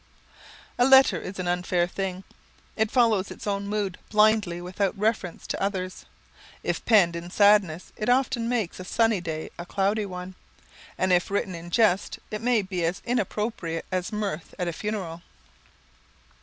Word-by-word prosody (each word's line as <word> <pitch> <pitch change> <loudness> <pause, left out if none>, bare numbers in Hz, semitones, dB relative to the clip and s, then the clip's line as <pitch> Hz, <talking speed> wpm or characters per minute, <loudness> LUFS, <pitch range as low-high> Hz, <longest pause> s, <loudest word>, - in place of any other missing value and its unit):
A 245 - +6
letter 265 0 +6
is 190 - -7
an 185 -1 -3
unfair 175 0 +1
thing. 190 +1 -4 0.5
It 220 0 +1
follows 220 -6 +3
its - - -9
own 200 -1 -2
mood 205 -3 -2
blindly 210 -4 +3
without 185 +3 -2
reference 210 -4 -1
to - - -4
others. 185 -2 -3 0.6
If - - -2
penned 185 -7 +5
in 170 +1 -6
sadness 200 -4 +3
it 215 - -2
often 250 -2 +2
makes 225 -9 -1
a - - -5
sunny 225 0 +1
day 160 -2 -5
a 175 - -5
cloudy 200 +2 0
one, 180 0 -7 0.6
and 185 0 +2
if 175 0 +2
written 195 -1 -1
in 170 0 -8
jest 200 0 +2
it 215 - -4
may 235 -3 +2
be 185 -2 -3
as 170 +2 -1
inopportune 210 -7 -2
as 185 -1 -2
mirth 200 -6 -4
at 180 -3 -2
a 170 - -2
funeral. 185 -5 -4
195 Hz, 160 wpm, -26 LUFS, 180-215 Hz, 0.6 s, A